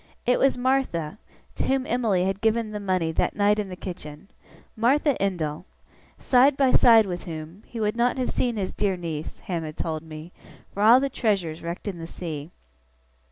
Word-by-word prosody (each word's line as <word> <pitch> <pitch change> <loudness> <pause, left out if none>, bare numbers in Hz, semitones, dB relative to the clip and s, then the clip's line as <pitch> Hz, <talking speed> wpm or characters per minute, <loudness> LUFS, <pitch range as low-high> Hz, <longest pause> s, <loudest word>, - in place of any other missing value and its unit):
It 250 - +3
was 270 -1 +3
Martha, 245 - -1 0.4
to - - -1
whom 265 -1 +1
Emily 220 -8 +1
had 195 +1 -2
given 225 0 +1
the 210 - -4
money 185 -5 0
that 160 - -1
night 205 +1 +3
in 205 -2 -3
the 185 - -6
kitchen. 175 -2 -9 0.4
Martha 275 +5 +2
Endell 170 -4 -2 0.5
side 265 +2 +4
by 270 -2 +3
side 230 -3 +6
with 180 -2 -5
whom, 160 +3 -8
he 235 - -7
would 210 0 0
not 240 +2 +1
have 255 - -1
seen 240 -3 -1
his 190 -2 -3
dear 195 -2 0
niece, 160 -3 -5
Ham 175 -3 -3
had 155 -1 -7
told 160 -2 -3
me, 160 +1 -10 0.4
for 200 - -4
all 230 +4 +7
the 275 - 0
treasures 195 -11 -1
wrecked 170 +4 -6
in 185 -4 -4
the 165 - -6
sea. 155 -4 -6
200 Hz, 190 wpm, -25 LUFS, 165-235 Hz, 0.5 s, all